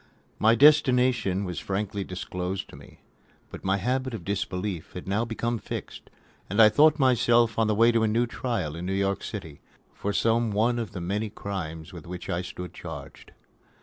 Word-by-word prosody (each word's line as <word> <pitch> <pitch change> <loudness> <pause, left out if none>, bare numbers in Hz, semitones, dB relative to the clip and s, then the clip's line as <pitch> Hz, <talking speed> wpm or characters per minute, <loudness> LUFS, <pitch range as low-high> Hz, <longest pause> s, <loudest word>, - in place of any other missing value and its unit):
My 110 +2 +5
destination 125 -8 +4
was 90 -2 -4
frankly 100 0 -3
disclosed 90 +1 -4
to - - -12
me. - - -15 0.5
But - - -9
my 95 +1 +1
habit 130 +4 -1
of 90 -7 -8
disbelief 95 -3 -3
had 90 - -8
now 105 +4 0
become 115 +1 -2
fixed, - - -7 0.4
and 100 - -1
I 110 -1 +9
thought 150 +7 +5
myself 120 -4 +3
on 110 - +3
the 110 - +1
way 115 +2 +5
to 115 -1 +2
a 110 +2 +2
trial 115 - -3
in 85 - -6
New 95 - -1
York 100 0 0
City, 80 -9 -7 0.3
for 100 - -3
some 115 +3 +2
one 120 +4 +2
of 110 -4 -5
the 90 - -5
many 105 +5 -2
crimes 90 -5 -6
with 85 -2 -10
which 90 0 -6
I 85 - -1
stood 90 0 -7
charged. - - -9
105 Hz, 180 wpm, -26 LUFS, 90-115 Hz, 0.5 s, I